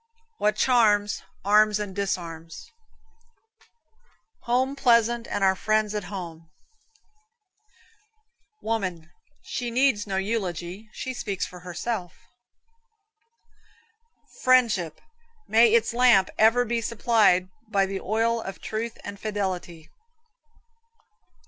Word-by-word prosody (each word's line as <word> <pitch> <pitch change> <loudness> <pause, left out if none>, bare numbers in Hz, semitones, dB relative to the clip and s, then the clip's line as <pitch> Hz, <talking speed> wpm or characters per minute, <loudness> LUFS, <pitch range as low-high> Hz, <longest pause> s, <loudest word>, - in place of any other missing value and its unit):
What 210 0 +2
charms, 215 -4 +2 0.2
arms 210 +1 +4
and 205 -3 -5
disarms. 165 -5 -5 1.7
Home 255 +3 +1
pleasant, 235 -3 +2
and 200 - -2
our 190 0 +4
friends 215 +1 0
at 210 -3 -3
home. 170 -5 -8 2.1
Woman 185 -7 -3 0.3
She 245 -1 -4
needs 235 -4 +1
no 190 -1 -2
eulogy, 190 -1 -3
she 260 +3 -5
speaks 200 -6 -3
for 180 - -11
herself. 180 +1 -5 2.3
Friendship 220 -11 +2 0.5
May 225 0 +5
its 230 +1 +2
lamp 240 -6 +4
ever 230 +3 +4
be 235 0 -1
supplied 215 -5 +2 0.2
by 200 -3 +2
the 195 0 -4
oil 225 +3 0
of 195 -3 -7
truth 225 +1 -4
and 200 0 -8
fidelity. 185 -6 -4
210 Hz, 100 wpm, -25 LUFS, 190-230 Hz, 2.3 s, May